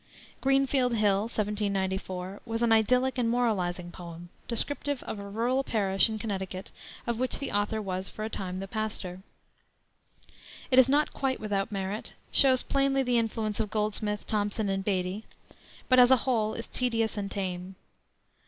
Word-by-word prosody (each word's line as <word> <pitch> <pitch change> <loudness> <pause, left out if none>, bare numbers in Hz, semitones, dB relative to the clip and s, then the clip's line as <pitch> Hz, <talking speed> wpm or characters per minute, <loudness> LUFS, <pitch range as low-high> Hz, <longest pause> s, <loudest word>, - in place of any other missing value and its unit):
Greenfield 270 -2 +3
Hill, 205 -3 +3
1794, 195 -3 -2
was 225 0 -2
an 235 - +3
idyllic 250 +4 +3
and 235 -2 +2
moralizing 185 -8 0
poem, 175 0 -9 0.2
descriptive 285 +3 0
of 210 - -5
a 200 0 -7
rural 240 +6 +1
parish 200 -3 +2
in 220 - -3
Connecticut 190 -2 -4 0.3
of 235 -1 -2
which 255 0 +1
the 275 - -4
author 205 +2 0
was 185 -2 -3
for 215 - -5
a - - -1
time 185 -2 -4
the 195 - -5
pastor. 195 -4 -4 1.5
It 255 - +7
is 260 - +7
not 295 +2 +2
quite 265 -1 -1
without 205 0 -1
merit; 195 +1 -4 0.2
shows 260 -2 +5
plainly 275 -1 +2
the 245 -2 +2
influence 220 -2 -2
of 215 - 0
Goldsmith, 210 -1 -1
Thomson, 205 0 -1
and 195 0 -1
Beattie, 190 +1 -1 0.6
but 255 -1 +6
as 245 0 +8
a 260 - +7
whole 220 -4 +1
is 230 - -4
tedious 230 -3 0
and 200 -2 -3
tame. 185 -1 -4
215 Hz, 160 wpm, -29 LUFS, 195-245 Hz, 1.5 s, as